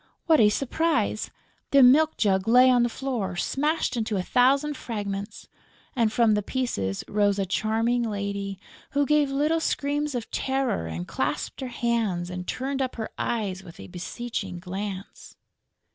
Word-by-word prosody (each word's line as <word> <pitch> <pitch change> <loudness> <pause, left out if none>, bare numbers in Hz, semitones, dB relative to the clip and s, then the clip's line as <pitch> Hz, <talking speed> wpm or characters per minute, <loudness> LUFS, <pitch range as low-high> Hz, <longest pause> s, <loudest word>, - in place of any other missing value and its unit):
What 320 -3 +5
a 210 - +6
surprise! 310 +8 0 0.4
The 275 -1 +6
milk 305 +5 +5
jug 190 -2 +1
lay 250 +2 +7
on 245 -1 +4
the 240 - +2
floor, 235 -8 -3
smashed 295 - 0
into 220 -3 -1
a 185 - -1
thousand 275 +7 +3
fragments, 205 -3 -5 0.5
and 230 -4 +2
from 230 -1 +3
the 210 - +1
pieces 195 - -2
rose 205 -1 +2
a 195 - 0
charming 220 +5 0
lady, 200 -1 -4 0.3
who 285 0 +2
gave 300 -1 +3
little 300 +4 +1
screams 290 -2 -1
of 235 -2 -4
terror 265 - -1
and 80 +2 -5
clasped 140 - -3
her 260 - -3
hands 225 -8 -1
and 180 0 -6
turned 270 +1 -2
up 260 -1 -2
her 220 -2 -4
eyes 195 -5 -2
with 170 -2 -13
a - - -8
beseeching 190 +1 -5
glance. 190 +2 -7
230 Hz, 160 wpm, -26 LUFS, 195-270 Hz, 0.5 s, lay